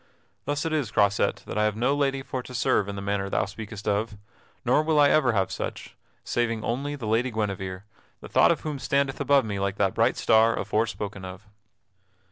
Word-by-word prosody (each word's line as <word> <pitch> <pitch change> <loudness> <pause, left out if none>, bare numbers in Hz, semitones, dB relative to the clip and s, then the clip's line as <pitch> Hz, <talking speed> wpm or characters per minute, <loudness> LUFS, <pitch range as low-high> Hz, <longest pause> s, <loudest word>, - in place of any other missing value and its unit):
Thus 145 +2 -2
it 165 - -1
is, 145 -8 0
Croisette, 100 -1 +1
that - - -3
I 105 - +3
have 105 -1 0
no 125 +5 +1
lady 135 -2 0
for 130 -1 -4
to 125 0 -10
serve 105 -3 +1
in 100 - -5
the 100 - -5
manner 100 -1 -1
thou - - +1
speakest 105 +1 -8
of. 105 +1 -1 0.5
Nor - - +4
will 155 -1 +2
I 145 -1 +6
ever 135 -6 +3
have 95 -3 0
such, - - -5 0.3
saving 115 -2 -1
only 140 +5 -2
the 130 -6 -7
Lady 115 +4 +1
Guinevere, 100 -4 -3 0.4
the - - -10
thought - - +4
of - - -1
whom 150 -3 -4
standeth 140 +1 0
above 140 -2 +4
me 100 -2 -3
like 100 0 -1
that 100 -2 +1
bright - - +2
star 110 +1 +4
afore 110 +2 0
spoken 100 -2 -6
of." 95 +3 -9
110 Hz, 210 wpm, -26 LUFS, 100-135 Hz, 0.5 s, I